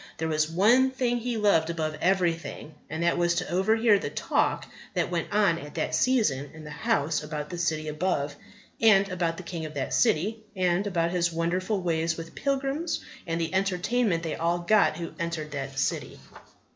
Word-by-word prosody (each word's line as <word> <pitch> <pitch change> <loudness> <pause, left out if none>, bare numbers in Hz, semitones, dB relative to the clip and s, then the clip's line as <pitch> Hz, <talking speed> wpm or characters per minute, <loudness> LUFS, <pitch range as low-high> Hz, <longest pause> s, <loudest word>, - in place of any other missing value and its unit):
There 160 - -2
was 155 -1 +1
one 225 +10 +4
thing 250 -2 0
he 240 0 -2
loved 200 -7 +3
above 155 -2 -2
everything, 175 -4 0 0.2
and 160 +2 -3
that 170 - +2
was 175 0 +2
to - - -2
overhear 215 +3 +3
the - - -3
talk - - 0 0.3
that - - 0
went - - -2
on - - +3
at - - -10
that - - -2
season 180 - +2
in 160 - -10
that 150 - -8
house 150 +1 0
about 150 0 -5
the 175 - -5
City 155 -2 -1
above, 150 -2 -1 0.5
and 200 -3 +6
about 170 -3 -1
the 185 - -7
King 170 -2 -5
of 155 -1 -7
that 135 -2 -2
City, 175 - +2
and 185 +1 +1
about 170 -3 0
His 175 -1 +1
wonderful 180 +5 -1
ways 165 -1 0
with 165 0 -8
pilgrims, 275 +4 -1 0.3
and 165 0 -1
the 165 +1 -2
entertainment 190 0 +1
they 160 -2 -2
all 170 +1 0
got 175 -2 +3
who 170 -1 -5
entered 165 -3 -3
that 135 -1 -5
City. - - -2
170 Hz, 185 wpm, -27 LUFS, 160-200 Hz, 0.5 s, and